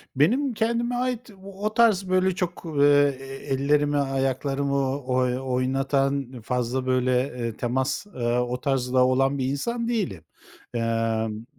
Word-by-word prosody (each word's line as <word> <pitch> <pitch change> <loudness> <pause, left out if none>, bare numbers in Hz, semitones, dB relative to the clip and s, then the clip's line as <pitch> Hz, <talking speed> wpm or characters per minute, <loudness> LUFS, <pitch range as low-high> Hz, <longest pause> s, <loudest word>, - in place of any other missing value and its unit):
Benim 245 - +2
kendime 235 +2 0
ait, 250 -1 -2
o 200 +2 -4
tarz 210 -5 +3
böyle 185 0 +2
çok, 180 -1 -3 0.2
eee, 145 -1 +5 0.3
ellerimi, 145 +2 +2
ayaklarımı, 135 0 0
oy 125 -1 +1
oynatan, 135 0 -1
fazla 125 +3 -2
böyle, 130 0 +1 0.3
eee, 115 -2 -4
temas, 130 +8 -1
ııı, 120 -9 -1
o 125 +1 -3
tarzda 130 -2 +2
olan 135 +2 +2
bir 130 - -1
insan 230 - -2
değilim. 195 - -2 0.5
Imm, 115 -1 -1
135 Hz, 125 wpm, -25 LUFS, 125-185 Hz, 0.5 s, eee